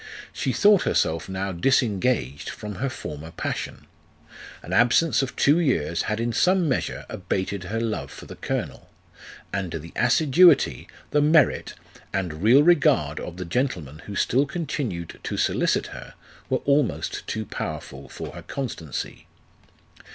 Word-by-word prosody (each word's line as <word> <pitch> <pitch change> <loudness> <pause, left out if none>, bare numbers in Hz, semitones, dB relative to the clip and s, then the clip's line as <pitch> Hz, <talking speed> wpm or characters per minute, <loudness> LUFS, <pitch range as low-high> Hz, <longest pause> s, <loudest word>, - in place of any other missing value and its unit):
She 130 - -1
thought 200 - +5
herself 80 +3 0
now 95 +1 -2
disengaged 100 - +1
from 105 -1 -7
her 135 - 0
former 80 - -7
passion. - - -5 0.8
An - - -6
absence 120 +8 +4
of 135 -2 -4
two 145 +4 +4
years 85 - +1
had 110 0 -1
in 115 0 -1
some 180 - +3
measure 130 - -2
abated 95 0 -3
her 110 +5 -2
love 115 -2 -2
for - - -11
the - - -10
colonel; - - -4 0.6
and 95 -4 -2
the 80 +1 -6
assiduity, 155 - +4 0.2
the 150 - +3
merit, 150 -1 +3 0.4
and 85 -5 -3
real 125 +8 +6
regard 150 - +3
of 90 - -7
the 90 - -5
gentleman 85 - -2
who 100 - -6
still 135 +8 +2
continued 135 - -4
to - - -4
solicit - - +1
her, - - -10 0.3
were - - 0
almost 140 -3 0
too 110 0 -3
powerful 70 -7 -6
for - - -7
her - - -8
constancy. 110 - -5
115 Hz, 145 wpm, -24 LUFS, 85-140 Hz, 0.8 s, real